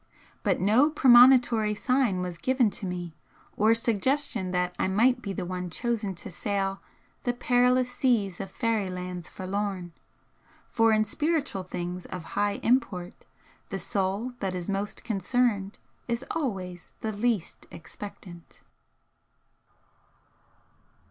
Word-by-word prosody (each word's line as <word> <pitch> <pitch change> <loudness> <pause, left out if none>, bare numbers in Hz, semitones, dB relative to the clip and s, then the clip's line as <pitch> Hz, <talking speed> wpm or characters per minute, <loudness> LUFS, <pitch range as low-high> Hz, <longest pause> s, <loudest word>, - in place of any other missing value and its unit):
But - - +1
no 225 +10 +4
premonitory 245 -5 +6
sign 250 -5 +1
was 180 -2 -5
given 255 -2 +2
to 200 -2 -5
me, 175 -2 -5 0.4
or 220 +2 +4
suggestion 230 -1 0
that 180 0 0
I - - +2
might 245 +6 +3
be 200 - -4
the 185 - -4
one 180 0 -4
chosen 215 0 -2
to 175 - -7
sail 195 +1 -2 0.4
'the 245 - 0
perilous 250 +1 +2
seas 215 -9 +1
of 195 - -5
fairy 215 -1 -1
lands 180 -1 -6
forlorn' 190 -2 -4 0.8
for 225 -1 +4
in 215 0 +3
spiritual 300 - -1
things 180 0 -5
of 180 -2 -6
high 205 0 +1
import, 200 -8 0 0.4
the 195 - -3
soul 195 +6 -1
that 190 -4 -2
is 175 -1 -4
most 200 +1 -3
concerned 215 -1 0 0.3
is 235 +2 -2
always 190 - -4
the 220 - -2
least 215 -3 -2
expectant. 175 0 -11
205 Hz, 125 wpm, -27 LUFS, 185-245 Hz, 0.8 s, premonitory